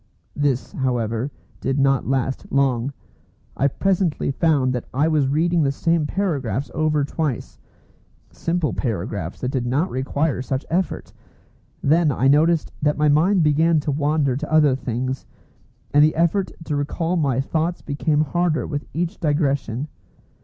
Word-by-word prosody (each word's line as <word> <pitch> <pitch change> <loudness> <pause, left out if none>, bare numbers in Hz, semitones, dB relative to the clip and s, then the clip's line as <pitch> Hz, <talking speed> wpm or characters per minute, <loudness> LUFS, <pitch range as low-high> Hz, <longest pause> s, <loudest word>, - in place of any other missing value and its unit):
This, 140 -3 0
however, 120 -1 -1 0.3
did 135 +2 -1
not 135 -1 +2
last 135 0 -1
long. 135 -2 +1 0.6
I 140 - +2
presently 180 -1 0
found 135 -3 +2
that 125 - -3
I 145 +4 +2
was 150 -4 +2
reading 165 +4 +2
the 140 -2 +2
same 165 +2 +1
paragraphs 145 - -2
over 155 -2 +1
twice, 145 -3 -3 0.7
simple 165 -2 -1
paragraphs 100 - -3
that 125 - -1
did 125 -3 -1
not 145 +9 0
require 135 +2 -1
such 130 +1 -3
effort. 180 +2 -2 0.7
Then 155 +1 +4
I 135 0 +1
noticed 155 +3 +3
that 150 0 +1
my 150 0 +3
mind 170 +5 +4
began 155 +2 +3
to 145 - -2
wander 145 -2 +1
to 155 +2 -5
other 150 -4 +5
things, 130 +1 -3 0.7
and 145 +1 +6
the 155 - +3
effort 170 +4 +1
to 150 - -2
recall 165 +4 -1
my 140 -7 +1
thoughts 160 +5 -1
became 150 +1 0
harder 165 +1 0
with 145 -1 -4
each 170 +1 -2
digression. 140 -4 0
145 Hz, 145 wpm, -22 LUFS, 135-160 Hz, 0.7 s, and